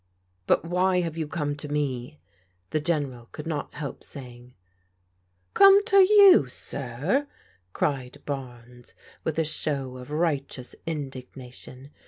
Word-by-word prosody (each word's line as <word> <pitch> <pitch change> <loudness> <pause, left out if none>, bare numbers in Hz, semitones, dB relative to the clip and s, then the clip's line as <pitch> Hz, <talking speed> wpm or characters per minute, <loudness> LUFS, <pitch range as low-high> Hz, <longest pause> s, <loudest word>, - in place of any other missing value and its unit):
" 90 0 -44
But - - +3
why 180 +1 +2
have 165 -2 -3
you 160 -2 -3
come 150 -3 -2
to 150 - -7
me? 145 -1 -3 0.2
" 90 0 -42
the 155 - +1
General 145 -7 -2
could 150 - -8
not 155 -3 -4
help 145 -2 -6
saying. 125 -2 -11 1.0
"Come 395 +1 +7
to 415 -4 +3
you, 390 - +8
sir!" 140 - -2 0.4
cried 130 +3 -2
Barnes, 125 -3 -8 0.3
with 160 - -2
a 160 - +2
show 140 -4 -3
of 125 +1 -10
righteous 145 -5 -2
indignation. 130 -2 -7
145 Hz, 135 wpm, -26 LUFS, 125-160 Hz, 1.0 s, you